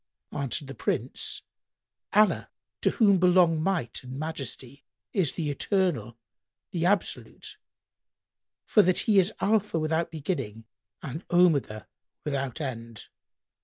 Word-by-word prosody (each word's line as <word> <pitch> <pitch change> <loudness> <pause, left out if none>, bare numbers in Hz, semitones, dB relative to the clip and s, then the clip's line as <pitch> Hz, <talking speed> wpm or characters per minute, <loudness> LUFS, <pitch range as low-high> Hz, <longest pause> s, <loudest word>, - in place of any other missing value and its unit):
Answered 140 0 -2
the 135 - -7
Prince, 130 - -3 0.7
"Allah 210 +1 +3 0.3
(to - - +3
whom 200 -5 +4
belong 175 -3 +4
Might 165 -10 -1
and 130 +1 -8
Majesty!) 140 -3 -6 0.3
is 185 -8 +1
the 155 -4 -2
Eternal, 140 - 0 0.5
the 170 -1 +1
Absolute; 200 +1 -2 1.1
for 210 - +5
that 185 -1 +3
He 210 -3 +4
is 190 +2 +3
Alpha, 210 -3 +1
without 160 +2 0
beginning, 135 - -4 0.4
and 155 +5 -5
Omega, 145 - +3 0.4
without 135 -2 -2
end. 115 -6 -6
160 Hz, 115 wpm, -27 LUFS, 130-185 Hz, 1.1 s, for